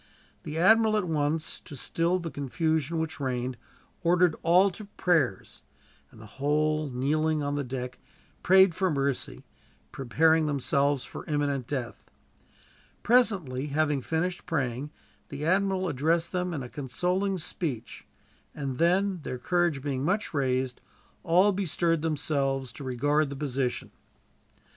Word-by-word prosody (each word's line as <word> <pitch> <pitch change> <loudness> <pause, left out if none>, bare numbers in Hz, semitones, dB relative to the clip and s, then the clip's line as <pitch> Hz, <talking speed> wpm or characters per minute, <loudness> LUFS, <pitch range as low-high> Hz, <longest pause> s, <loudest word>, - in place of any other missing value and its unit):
The 155 +1 -6
admiral 220 +4 +5
at 210 - +1
once, 155 0 -1
to 145 - -11
still 165 +6 0
the 170 -3 -5
confusion 155 +3 -1
which 160 -1 -3
reigned, 130 -2 -2 0.5
ordered 175 -1 +3
all 180 +4 +5
to 210 +4 -8
prayers; 165 - 0 0.5
and - - -17
the 110 - -11 0.2
whole, 155 +1 +1
kneeling 150 +4 0
on 145 0 -1
the 145 0 -1
deck, 125 0 -5 0.4
prayed 190 -1 +6
for 185 +2 0
mercy, 140 -3 -2 0.5
preparing 160 +5 +2
themselves 140 -1 +1
for - - -8
imminent 145 -4 -1
death. 130 -5 -4 1.0
Presently, 190 - +2
having 150 -1 +1
finished 175 +6 -2
praying, 140 -4 -2 0.4
the 145 +1 -5
admiral 190 +1 +1
addressed 165 +4 0
them 180 -1 -1
in 145 -6 -4
a - - -6
consoling 180 +10 -1
speech; 150 -8 -4 0.5
and 135 -3 -4
then, 185 +2 +2
their 130 - -5
courage 170 0 0
being 135 -2 -2
much 200 +6 0
raised, 130 -3 -1 0.4
all 180 +4 +4
bestirred 170 -4 0
themselves 140 -4 -1
to 120 - -9
regard 145 +4 +1
the 140 - -6
position. 135 -3 -2
150 Hz, 135 wpm, -28 LUFS, 135-175 Hz, 1.0 s, prayed